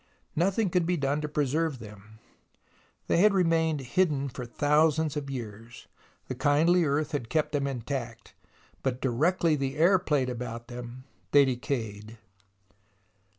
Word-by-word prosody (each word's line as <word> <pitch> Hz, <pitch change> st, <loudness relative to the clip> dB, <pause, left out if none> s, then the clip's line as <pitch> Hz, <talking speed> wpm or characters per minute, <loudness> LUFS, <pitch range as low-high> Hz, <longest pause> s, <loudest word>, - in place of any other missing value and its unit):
Nothing 190 Hz, +4 st, +1 dB
could 175 Hz, -2 st, +1 dB
be 180 Hz, 0 st, +1 dB
done 140 Hz, +1 st, 0 dB
to 150 Hz, -, -2 dB
preserve 150 Hz, +1 st, 0 dB
them. 110 Hz, -1 st, -13 dB, 0.9 s
They -, -, +1 dB
had 200 Hz, +3 st, +5 dB
remained 165 Hz, -4 st, +2 dB
hidden 140 Hz, 0 st, 0 dB
for 125 Hz, -1 st, -7 dB
thousands 150 Hz, +3 st, +2 dB
of 145 Hz, -2 st, -4 dB
years. 115 Hz, -2 st, -8 dB, 0.4 s
The -, -, -3 dB
kindly 165 Hz, +5 st, +3 dB
earth 150 Hz, +2 st, 0 dB
had 140 Hz, -7 st, -3 dB
kept 155 Hz, 0 st, 0 dB
them 140 Hz, -1 st, 0 dB
intact, 120 Hz, -3 st, -5 dB, 0.5 s
but 130 Hz, -2 st, -2 dB
directly 155 Hz, +6 st, +1 dB
the 135 Hz, 0 st, -3 dB
air 180 Hz, +4 st, +5 dB
played 145 Hz, -7 st, 0 dB
about 120 Hz, -1 st, -6 dB
them 120 Hz, +1 st, -8 dB, 0.3 s
they 145 Hz, -1 st, +7 dB
decayed. 115 Hz, -5 st, -4 dB
140 Hz, 140 wpm, -28 LUFS, 125-160 Hz, 0.9 s, they